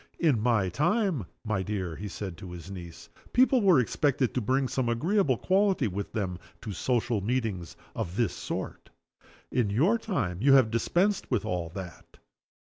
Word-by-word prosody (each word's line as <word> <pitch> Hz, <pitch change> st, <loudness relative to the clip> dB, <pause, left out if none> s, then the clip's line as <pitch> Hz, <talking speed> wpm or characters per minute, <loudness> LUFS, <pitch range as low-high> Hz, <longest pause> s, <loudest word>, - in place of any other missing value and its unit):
"In 145 Hz, -10 st, +2 dB
my 110 Hz, -5 st, +2 dB
time, 150 Hz, -, +1 dB, 0.2 s
my 105 Hz, -3 st, 0 dB
dear," 95 Hz, -4 st, -3 dB
he 105 Hz, +5 st, -6 dB
said 95 Hz, -2 st, -6 dB
to 95 Hz, 0 st, -9 dB
his 90 Hz, +2 st, -9 dB
niece, 85 Hz, -3 st, -9 dB, 0.3 s
"people 255 Hz, 0 st, +5 dB
were 185 Hz, -8 st, +6 dB
expected 130 Hz, +1 st, +1 dB
to 125 Hz, -, 0 dB
bring 130 Hz, +4 st, +1 dB
some 125 Hz, -1 st, -1 dB
agreeable 150 Hz, -, +2 dB
quality 190 Hz, -, +2 dB
with 100 Hz, +1 st, -4 dB
them 95 Hz, -4 st, -3 dB, 0.2 s
to 105 Hz, -, -5 dB
social 120 Hz, +1 st, 0 dB
meetings 105 Hz, -, -2 dB, 0.2 s
of 85 Hz, -, -3 dB
this 110 Hz, -5 st, +1 dB
sort. -, -, -5 dB, 0.6 s
In 120 Hz, -5 st, +1 dB
your 165 Hz, -, +3 dB
time 95 Hz, -, -2 dB
you 135 Hz, +2 st, +6 dB
have 130 Hz, -5 st, +5 dB
dispensed 180 Hz, -, +1 dB
with 110 Hz, -6 st, 0 dB
all 90 Hz, -5 st, -2 dB
that. 95 Hz, -3 st, -9 dB
115 Hz, 165 wpm, -28 LUFS, 95-145 Hz, 0.6 s, were